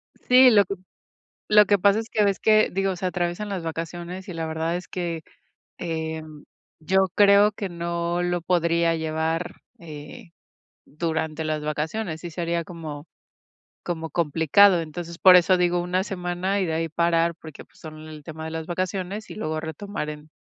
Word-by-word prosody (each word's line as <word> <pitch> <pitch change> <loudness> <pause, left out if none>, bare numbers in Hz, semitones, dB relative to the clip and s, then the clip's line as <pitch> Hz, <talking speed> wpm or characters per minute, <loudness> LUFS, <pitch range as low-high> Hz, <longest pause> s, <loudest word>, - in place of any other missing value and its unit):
Sí, 255 0 +6
lo 205 -2 +5
que 200 - -4 0.8
lo 210 0 +8
que 205 0 +3
pasa 200 +3 +4
es 225 +1 -5
que 210 -1 +2
ves 200 -1 +1
que, 215 -1 +4
digo, 195 0 0
se 185 - -3
atraviesan 180 +3 -2
las 190 -4 -4
vacaciones 170 +4 -6
y 180 - -6
la 165 -1 -3
verdad 160 +2 -2
es 180 - -7
que, 170 -3 -4 0.6
em, 160 -2 -5 0.4
yo 190 +4 +2
creo 205 +1 +6
que 200 -1 -5
no 170 0 -2
lo 175 0 -1
podría 170 -1 +1
llevar, 160 +2 -2 0.2
eh, 165 +5 -11 0.6
durante 160 0 -3
las 155 -1 -2
vacaciones, 160 +3 -3
sí 175 - -7
sería 170 0 -2
como 155 -3 -8 0.8
como 165 -2 -4
complicado. 170 +4 +4
Entonces, 170 +1 -7
por 185 -1 +8
eso 180 +1 +5
digo 175 0 +2
una 180 +2 0
semana 185 +1 -2
y 185 - 0
de 160 - -2
ahí 165 0 -1
parar, 170 +1 +1
porque, 155 -3 -11
pues, - - -26
son 155 0 -10
el 155 -2 -11
tema 160 0 -8
de 160 - -5
las 160 0 -5
vacaciones 185 +3 -4
y - - -8
luego 155 -6 -3
retomar 160 +1 -5
en, 150 0 -10
170 Hz, 175 wpm, -24 LUFS, 160-185 Hz, 0.8 s, lo